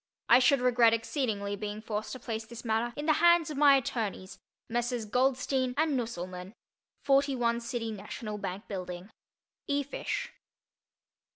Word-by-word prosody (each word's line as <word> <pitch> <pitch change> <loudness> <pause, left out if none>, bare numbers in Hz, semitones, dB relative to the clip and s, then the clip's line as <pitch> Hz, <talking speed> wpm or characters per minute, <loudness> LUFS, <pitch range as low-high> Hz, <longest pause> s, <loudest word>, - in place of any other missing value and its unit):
I 240 - +8
should 255 +1 +4
regret 240 -2 +5
exceedingly 220 -4 -2
being 210 +1 -5
forced 215 -1 -4
to 260 - -7
place 225 -2 -4
this 235 +2 -11
matter 225 +1 0
in 295 - -3
the 310 - +4
hands 345 -2 +5
of 295 - -6
my 285 -2 +7
attorneys, 220 -7 -3 0.3
Messrs. 240 0 -1
Goldstein 255 +2 +1
and 310 -2 +2
Nusselmann, 185 -5 -5 0.5
41 270 -4 +2
City 235 -1 -4
Nat'l 210 +1 -6
Bank 195 +1 -5
Bldg. 180 0 -6 0.6
E. 285 0 +1
FISH. 485 - -4
235 Hz, 145 wpm, -30 LUFS, 210-265 Hz, 0.6 s, I